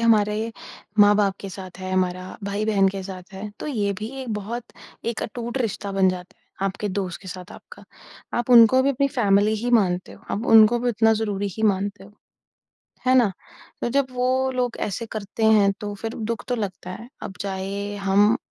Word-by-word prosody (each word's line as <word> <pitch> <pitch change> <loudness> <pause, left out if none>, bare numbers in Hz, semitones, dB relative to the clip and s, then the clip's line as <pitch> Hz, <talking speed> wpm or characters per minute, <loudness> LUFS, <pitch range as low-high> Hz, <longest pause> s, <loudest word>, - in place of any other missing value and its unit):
हमारे 220 0 +2 0.5
माँ-बाप 205 -1 +5
के 200 - -6
साथ 185 -1 -9
है, 185 0 -5
हमारा 185 0 -1
भाई-बहन 200 -1 +2
के 195 0 -4
साथ 185 0 -9
है, 195 +2 -6
तो - - -4
ये 210 -9 0
भी 215 - -4
एक 255 - -8
बहुत 225 +4 -4 0.4
एक 235 -1 -2
अटूट 240 +3 -4
रिश्ता 205 -4 -2
बन 195 -1 +4
जाता 180 0 -5
है, - - -39 0.2
आपके 195 +2 -3
दोस्त 185 -2 -3
के 190 - -9
साथ 180 +1 -8
आपका। - - -13 0.5
आप 240 +1 -2
उनको 240 +2 +8
भी 275 - +3
अपनी 275 +1 +1
फैमिली 210 -4 +3
ही 245 - 0
मानते 185 -6 +2
हो, - - -16
आप 220 - -2
उनको 225 +1 +7
भी 245 +1 0
उतना 225 0 +3
ज़रूरी 205 -2 -1
ही 220 - -4
मानते 200 -1 0
हो। 205 - -16 0.9
है 255 - +5
ना? 240 -6 +4 0.5
तो - - 0
जब 275 +1 +2
वो 255 +1 +1
लोग 250 -2 -1
ऐसे 210 +3 -3
करते 215 +1 -3
हैं 210 -2 +5
तो 205 -1 -4
फिर 225 +3 -5
दुःख 230 +1 -3
तो 250 - +1
लगता 190 -4 -5
है, 225 +6 -8
अब 190 - -6
चाहे 200 +1 -4
हम 205 +3 +3
210 Hz, 195 wpm, -23 LUFS, 195-230 Hz, 0.9 s, उनको